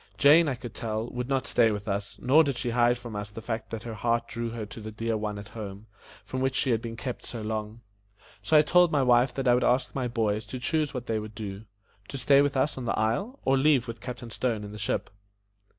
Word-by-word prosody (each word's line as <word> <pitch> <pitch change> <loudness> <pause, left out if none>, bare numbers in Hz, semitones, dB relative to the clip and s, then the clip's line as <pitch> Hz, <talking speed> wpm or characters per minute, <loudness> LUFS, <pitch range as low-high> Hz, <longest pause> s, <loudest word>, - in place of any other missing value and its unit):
Jane, 155 +3 +6
I 140 - 0
could 120 -2 -9
tell, 110 0 -3
would 125 +1 -4
not 135 -1 0
stay 115 -4 +4
with 105 -1 -4
us, 100 0 -3
nor 145 +6 +5
did 140 -4 -1
she 120 0 -2
hide 120 +1 +3
from 120 -2 -8
us 105 0 -4
the 105 - -8
fact 110 0 -4
that 110 -2 -5
her 115 - -5
heart 115 +2 0
drew 115 0 -4
her 115 -1 -5
to 105 +2 -10
the 110 - -6
dear 115 +1 -2
one 105 -1 -3
at 100 +1 -9
home, 105 -2 -8 0.4
from 130 - -4
whom 130 +1 +2
she 135 0 0
had 115 -1 +1
been 115 -1 -6
kept 125 +2 -5
so 115 -3 -6
long. 110 +1 -4 0.6
So 130 +10 +4
I 150 - +7
told 175 +2 +4
my 145 -3 +3
wife 125 0 +4
that 135 -1 -1
I 120 - +6
would 125 +1 +2
ask 125 +1 +2
my 130 -2 -1
boys 110 -3 0
to 130 +3 -6
choose 155 +2 0
what 125 -3 -5
they 110 -2 -1
would 105 0 -8
do 105 -1 -6 0.4
to 140 - -6
stay 140 +2 +5
with 145 -1 +1
us 135 +1 +1
on 125 - -5
the - - -1
isle, 195 - 0
or 135 0 +3
leave 135 -4 +3
with 115 -1 -7
Captain 120 -2 -7
Stone 115 -3 -1
in 105 - -7
the 105 - -8
ship. 105 - -2
120 Hz, 260 wpm, -27 LUFS, 110-130 Hz, 0.6 s, I